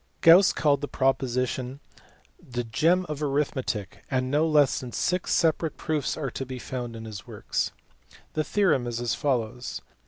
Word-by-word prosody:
Gauss 175 +4 +8
called 145 -3 +2
the 145 - -2
proposition 130 0 0 0.3
" - - -31
the 120 - 0
gem 165 +11 +2
of 150 -1 -5
arithmetic," 135 -7 -2
and 130 -1 0
no 150 +3 +3
less 150 -3 +4
than 125 -2 -7
six 180 +6 -1
separate 160 -1 +2
proofs 155 -3 -1
are 140 -5 -3
to 135 - -4
be 130 -1 -6
found 120 -2 -5
in 115 0 -8
his 105 -3 -8
works. - - -2 0.6
The 155 - 0
theorem 170 -10 +2
is 120 -1 -3
as 120 -2 0
follows. 125 -3 -2
135 Hz, 165 wpm, -26 LUFS, 120-155 Hz, 0.6 s, Gauss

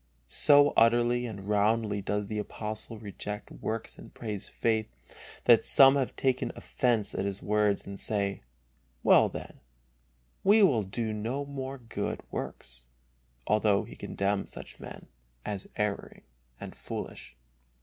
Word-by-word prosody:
So 145 - +5
utterly 120 +1 +4
and 100 -3 -8
roundly 105 0 +1
does 105 +1 -1
the 105 +1 -3
Apostle 110 +2 -5
reject 105 0 -6
works 110 0 -5
and - - -12
praise 105 -4 -6
faith, 110 -2 0 0.5
that - - +6
some 135 0 +7
have 135 -3 -1
taken 130 -1 0
offence 115 -5 0
at - - -2
his 100 0 -4
words 105 -1 +1
and 100 -1 -8
say: 100 -2 -1 0.6
"Well, - - +6
then, - - -8 0.8
we 210 +2 +6
will 130 - +4
do 110 +3 -3
no 120 +7 -3
more 135 -1 -5
good 115 -3 -4
works," - - -6 0.6
although 105 -1 +3
he - - -11
condemns 100 0 -2
such - - -10
men - - -10 0.4
as 100 -2 -5
erring 105 -1 -3 0.4
and - - -8
foolish. 60 -1 -7
110 Hz, 135 wpm, -29 LUFS, 100-120 Hz, 0.8 s, some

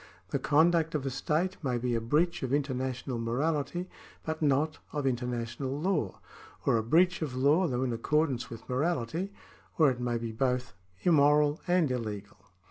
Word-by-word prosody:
The - - -1
conduct 160 +1 +3
of 140 -2 -1
a 135 - -1
state 165 +7 -1
may 125 -3 0
be 120 0 -1
a 115 - 0
breach 150 +9 +1
of 130 -2 -3
international 130 -3 -1
morality 145 +8 -1 0.4
but 160 0 -3
not 150 +1 +1
of 145 -2 -2
international 125 +2 -2
law, 155 - -1 0.5
or - - +4
a - - +1
breach 175 +10 +3
of 145 -5 -3
law 145 +8 +3
though 125 -3 -1
in 125 -2 -1
accordance 135 +2 0
with 115 -2 -10
morality, 160 +6 -1 0.5
or 155 -4 +5
it 125 - -5
may 120 -1 -1
be 115 -1 -4
both 125 +1 -1 0.3
immoral 150 -2 +4
and 175 -6 +3
illegal. 105 -5 -4
140 Hz, 165 wpm, -30 LUFS, 125-160 Hz, 0.5 s, or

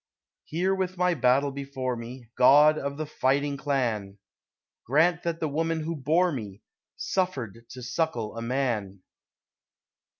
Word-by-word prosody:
Here 180 +5 0
with 185 -1 -2
my 180 0 +2
battle 135 0 +2
before 135 -2 -4
me, 120 0 -9
God 145 +4 +7
of 140 0 -4
the 155 - -3
fighting 140 0 0
Clan, 120 -9 -1 0.7
Grant 165 +6 +3
that 170 -1 -2
the 160 - -1
woman 160 +2 -1
who 165 +2 -3
bore 160 +6 +2
me 105 -8 -7 0.3
Suffered 125 - -2
to 125 -1 -9
suckle 120 -4 -2
a 115 - -5
Man! 115 -7 -2
140 Hz, 135 wpm, -27 LUFS, 120-160 Hz, 0.7 s, God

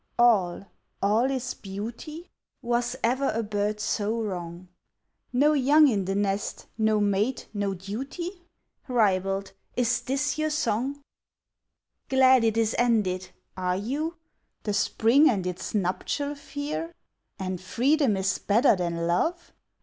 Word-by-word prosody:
all 200 -7 +3 0.4
all 220 +6 +3
is 260 -1 -2
beauty?" 230 - -7 0.3
Was 240 +1 0
ever 260 +4 +2
a 230 - 0
bird 210 0 -1
so 215 +1 -1
wrong! 180 -4 -5 0.6
"No 290 +5 +4
young 295 +2 +5
in 205 -7 +1
the 195 +1 -1
nest, 200 0 -1
no 220 -1 +2
mate, 205 +5 0
no 200 -2 -1
duty?" 275 - -6 0.5
Ribald! 195 -5 +1 0.2
is 245 -1 +1
this 280 +3 -1
your 310 0 +1
song? 275 0 -1 1.1
"Glad 260 -2 +5
it 225 -1 +2
is 225 -1 +2
ended," 205 -6 +1 0.3
are 180 -1 -1
you? 295 - -3 0.5
The 210 - -1
Spring 230 +9 +4
and 195 -6 0
its 180 +3 -4
nuptial 210 +9 -1
fear? 295 +4 -5 0.4
"And 185 -2 -4
freedom 250 +4 +2
is 190 0 0
better 225 +4 +4
than 170 -2 -2
love?" 325 - -1
225 Hz, 125 wpm, -26 LUFS, 195-270 Hz, 1.1 s, young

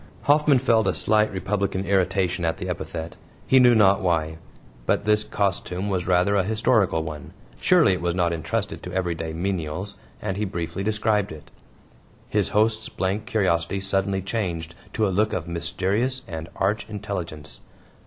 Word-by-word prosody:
Hoffman 150 -1 +4
felt 115 -3 +3
a - - +2
slight 110 0 +3
republican 95 0 -1
irritation 95 -2 +1
at 80 0 0
the - - -5
epithet 80 +1 -5 0.3
he 130 - +5
knew 125 -1 +6
not 100 -1 +5
why. 80 -3 0 0.5
But - - +1
this 105 0 +3
costume 100 -2 -2
was 90 -3 -1
rather 90 +2 +3
a 100 - +4
historical 105 -4 +2
one; 75 -2 -7 0.3
surely 95 - +5
it 90 - -3
was 85 0 0
not 85 -2 +1
entrusted 80 -2 -3
to 90 - -7
everyday 85 -3 -2
menials 90 +2 -3 0.2
and 95 -2 -3
he 105 - 0
briefly 85 -1 -4
described 105 -1 +1
it. 75 -2 -11 0.8
His - - 0
host's 110 +1 +1
blank 100 +4 -2
curiosity 95 -5 +1
suddenly 95 0 -1
changed 85 -6 -3 0.2
to 110 -2 +1
a 95 - -1
look 105 +3 +1
of 85 -2 -3
mysterious 95 +10 -1
and 80 0 -6
arch 105 +2 -1
intelligence. 90 -8 -5
95 Hz, 160 wpm, -24 LUFS, 85-105 Hz, 0.8 s, knew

